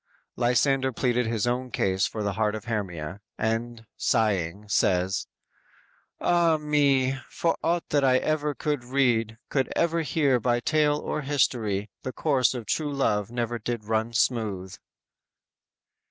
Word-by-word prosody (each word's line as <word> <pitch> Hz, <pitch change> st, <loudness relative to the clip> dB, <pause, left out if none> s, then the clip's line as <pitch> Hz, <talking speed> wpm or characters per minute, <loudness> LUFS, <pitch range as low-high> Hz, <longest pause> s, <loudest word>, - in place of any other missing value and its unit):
Lysander 130 Hz, +2 st, +2 dB
pleaded 125 Hz, -1 st, 0 dB
his 115 Hz, -1 st, 0 dB
own 125 Hz, +1 st, -1 dB
case 95 Hz, -4 st, +1 dB
for 110 Hz, -, -4 dB
the 100 Hz, -1 st, -1 dB
heart 105 Hz, +1 st, 0 dB
of 110 Hz, -, -7 dB
Hermia, 95 Hz, -5 st, -4 dB, 0.2 s
and 115 Hz, +1 st, -2 dB
sighing, 105 Hz, -4 st, 0 dB
says: 95 Hz, -2 st, +1 dB, 0.9 s
_"Ah, 170 Hz, -2 st, +3 dB
me! 140 Hz, -3 st, +2 dB
for 165 Hz, -, 0 dB
aught 170 Hz, +1 st, 0 dB
that 145 Hz, -1 st, +2 dB
I 130 Hz, -1 st, +5 dB, 0.4 s
could 150 Hz, -3 st, -1 dB
ever -, -, -15 dB
read, 115 Hz, -5 st, +2 dB
Could 135 Hz, -2 st, 0 dB
ever 170 Hz, 0 st, +1 dB
hear 145 Hz, -5 st, +2 dB
by 120 Hz, +1 st, +1 dB
tale 150 Hz, +2 st, +2 dB
or 150 Hz, -, -3 dB
history, 110 Hz, -8 st, 0 dB
The 130 Hz, -, -5 dB
course 135 Hz, -5 st, +2 dB
of 120 Hz, -3 st, -5 dB
true 150 Hz, +4 st, -1 dB
love 105 Hz, -7 st, 0 dB
never 120 Hz, 0 st, -2 dB
did 115 Hz, 0 st, -4 dB
run 110 Hz, +1 st, 0 dB
smooth!" 105 Hz, -6 st, 0 dB
120 Hz, 140 wpm, -26 LUFS, 105-140 Hz, 0.9 s, I